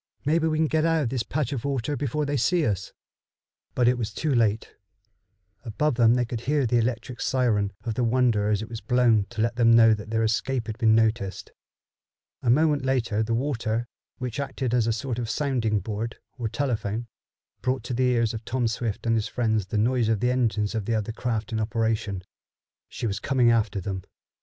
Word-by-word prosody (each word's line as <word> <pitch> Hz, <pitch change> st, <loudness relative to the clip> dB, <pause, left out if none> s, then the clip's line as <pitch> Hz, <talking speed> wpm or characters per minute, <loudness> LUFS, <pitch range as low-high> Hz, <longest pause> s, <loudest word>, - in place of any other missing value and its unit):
Maybe 160 Hz, +2 st, +2 dB
we 155 Hz, -1 st, 0 dB
can 160 Hz, -, +3 dB
get 155 Hz, 0 st, +1 dB
out 165 Hz, -1 st, +2 dB
of 120 Hz, -, -1 dB
this 125 Hz, -1 st, -1 dB
patch 145 Hz, +3 st, -2 dB
of 125 Hz, -, -4 dB
water 140 Hz, 0 st, -1 dB
before 145 Hz, +2 st, -1 dB
they 145 Hz, 0 st, -1 dB
see 155 Hz, +7 st, +2 dB
us." 100 Hz, -3 st, -2 dB, 0.8 s
But 125 Hz, -1 st, +3 dB
it 125 Hz, 0 st, +3 dB
was 110 Hz, -3 st, -2 dB
too 155 Hz, -3 st, 0 dB
late. 110 Hz, -3 st, +1 dB, 0.9 s
Above 130 Hz, +6 st, 0 dB
them 120 Hz, -1 st, +4 dB
they 125 Hz, -1 st, +1 dB
could 115 Hz, -1 st, -5 dB
hear 145 Hz, +1 st, +1 dB
the 120 Hz, 0 st, +2 dB
electric 120 Hz, +1 st, -2 dB
siren 110 Hz, -6 st, +1 dB
of 115 Hz, -, -2 dB
the 125 Hz, -, -1 dB
Wonder 115 Hz, -3 st, +2 dB
as 105 Hz, 0 st, +1 dB
it -, -, -7 dB
was 115 Hz, -1 st, -7 dB
blown 120 Hz, -5 st, +3 dB
to 110 Hz, -, -4 dB
let 115 Hz, +1 st, -1 dB
them 115 Hz, -1 st, +5 dB
know 115 Hz, -1 st, +7 dB
that 105 Hz, 0 st, -5 dB
their 110 Hz, 0 st, +1 dB
escape 120 Hz, +2 st, 0 dB
had 110 Hz, +1 st, -6 dB
been 110 Hz, -2 st, +4 dB
noticed. 110 Hz, -3 st, 0 dB, 0.9 s
A 120 Hz, -, 0 dB
moment 145 Hz, +2 st, +3 dB
later 120 Hz, -5 st, 0 dB
the 115 Hz, +1 st, 0 dB
water, 115 Hz, -3 st, -1 dB, 0.3 s
which 125 Hz, -1 st, -4 dB
acted 130 Hz, -3 st, -3 dB
as 120 Hz, -2 st, +2 dB
a -, -, +2 dB
sort 120 Hz, +1 st, -3 dB
of 115 Hz, -2 st, -3 dB
sounding 115 Hz, -5 st, 0 dB
board, 110 Hz, +3 st, -4 dB, 0.2 s
or 120 Hz, -4 st, -3 dB
telephone, 115 Hz, -4 st, -2 dB, 0.6 s
brought 130 Hz, -2 st, -1 dB
to 125 Hz, -, -4 dB
the 130 Hz, +2 st, +1 dB
ears 115 Hz, -3 st, +1 dB
of 110 Hz, 0 st, -6 dB
Tom 120 Hz, +1 st, -1 dB
Swift 115 Hz, -1 st, -3 dB
and 115 Hz, -, +2 dB
his 110 Hz, -2 st, 0 dB
friends 110 Hz, -5 st, 0 dB
the 105 Hz, -, -2 dB
noise 115 Hz, +1 st, +2 dB
of 110 Hz, -2 st, +1 dB
the 125 Hz, +3 st, +1 dB
engines 110 Hz, -4 st, 0 dB
of 110 Hz, -3 st, -2 dB
the 115 Hz, -, 0 dB
other 110 Hz, 0 st, -2 dB
craft 115 Hz, -2 st, -3 dB
in 110 Hz, -, 0 dB
operation. 110 Hz, -3 st, -1 dB, 0.7 s
She -, -, -5 dB
was 100 Hz, -3 st, -1 dB
coming 125 Hz, -1 st, +3 dB
after 110 Hz, -3 st, +1 dB
them. 95 Hz, 0 st, -4 dB
115 Hz, 210 wpm, -25 LUFS, 110-130 Hz, 0.9 s, know